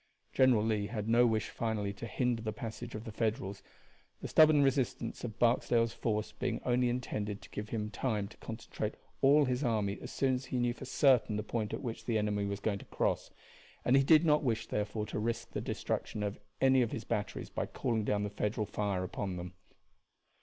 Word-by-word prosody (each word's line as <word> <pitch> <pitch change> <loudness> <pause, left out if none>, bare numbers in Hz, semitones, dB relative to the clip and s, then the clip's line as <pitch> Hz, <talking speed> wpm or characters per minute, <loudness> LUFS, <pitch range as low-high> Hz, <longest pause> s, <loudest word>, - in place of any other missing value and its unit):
General 130 -5 +5
Lee 105 -2 0
had 105 -1 -4
no 120 +2 +5
wish 110 -1 0
finally 105 -3 -2
to 110 +4 -7
hinder 120 -1 0
the 110 -1 -2
passage 115 +2 -6
of 110 - -5
the 115 - -7
Federals, 110 -2 -2 0.6
the - - -5
stubborn 155 -2 +6
resistance 135 -2 0
of 110 -3 -5
Barksdale's 115 -1 +3
force 110 -2 -1
being 125 -2 -2
only 125 0 +3
intended 105 -4 -3
to - - -14
give 105 0 -5
him 105 -2 -3
time 110 -6 -1
to - - -16
concentrate 110 -1 -5 0.3
all 145 +2 +6
his 130 +2 0
army 105 -5 0
as - - -7
soon 135 -1 +1
as 130 +1 -2
he 130 - -3
knew 120 -1 +1
for 130 - -9
certain 130 -4 +3
the 105 - -1
point 110 0 -2
at - - -4
which 115 -3 -5
the 115 -2 +1
enemy 105 -1 0
was 100 0 -3
going 100 -1 -1
to - - -12
cross; - - -1 0.6
and 125 - +5
he 135 - +7
did 155 +3 +6
not 150 -1 +4
wish, 120 -7 0
therefore, 105 +1 -2
to 105 - -4
risk 115 +2 -2
the - - -3
destruction 105 - -3
of 105 0 -3 0.2
any 130 -1 +5
of 120 - 0
his 115 - -4
batteries 105 -3 -3
by - - -2
calling 115 -2 -1
down 105 0 0
the 105 - -2
Federal 105 +1 -1
fire 100 -2 -1
upon 95 0 -3
them. 90 +1 -6
115 Hz, 210 wpm, -32 LUFS, 105-125 Hz, 0.6 s, he